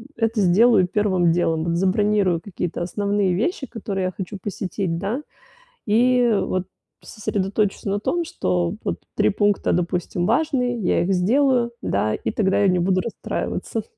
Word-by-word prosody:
это 225 -1 0
сделаю 195 +1 +5
первым 185 -3 +2
делом, 165 -1 0
забронирую 190 -1 +2
какие-то 180 -3 -4
основные 200 +1 0
вещи, 270 - -1
которые 200 -5 -4
я 185 - -1
хочу 195 +1 -5
посетить, 190 -3 -3
да, 215 +9 -2 0.7
и, 245 +2 +3
вот, 185 -1 -1 0.4
сосредоточусь 205 -1 -2
на 200 0 0
том 345 +11 -1
что, 90 - -1
вот, - - -2 0.2
3 105 - +3
пункта, 205 - +1
допустим 175 0 -1
важные, 250 -6 +1
я 190 - +1
их 190 +2 +1
сделаю, 240 +6 +2
да, 105 +2 0
и - - -3
тогда 195 -2 +1
я 200 - +4
не 180 -1 +2
буду 185 +1 +2
расстраиваться. 230 - -4
195 Hz, 145 wpm, -22 LUFS, 180-225 Hz, 0.7 s, сделаю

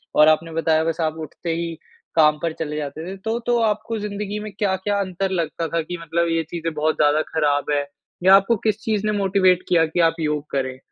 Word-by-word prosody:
और 150 +1 +7
आपने 155 +1 +2
बताया 160 -1 +2
बस 165 +1 -2
आप 160 0 -1
उठते 165 +3 -5
ही 170 0 -3 0.4
काम 150 -1 +5
पर 165 -1 0
चले 150 -1 -3
जाते 150 +2 -5
थे। - - -6
तो 220 +4 -2
तो 240 0 +3
आपको 220 +1 0
ज़िन्दगी 205 0 -4
में 215 - -6
क्या-क्या 200 0 0
अंतर 190 0 -2
लगता 165 +1 -3
था 165 +1 -1
कि 175 +3 -6
मतलब 170 +1 0
ये 165 0 +1
चीज़ें 165 -1 -3
बहुत 155 +1 0
ज़्यादा 150 +1 +3
ख़राब 150 -2 +1
है 145 -1 +1 0.4
या 190 +1 +8
आपको 200 +4 +4
किस 210 -1 +1
चीज़ 215 -2 -1
ने 215 - +2
मोटिवेट 185 -2 +3
किया 165 -2 +4
कि 165 +2 -3
आप 165 - -7
योग 150 -2 -1
करें? 130 -1 -2
165 Hz, 220 wpm, -22 LUFS, 155-195 Hz, 0.4 s, या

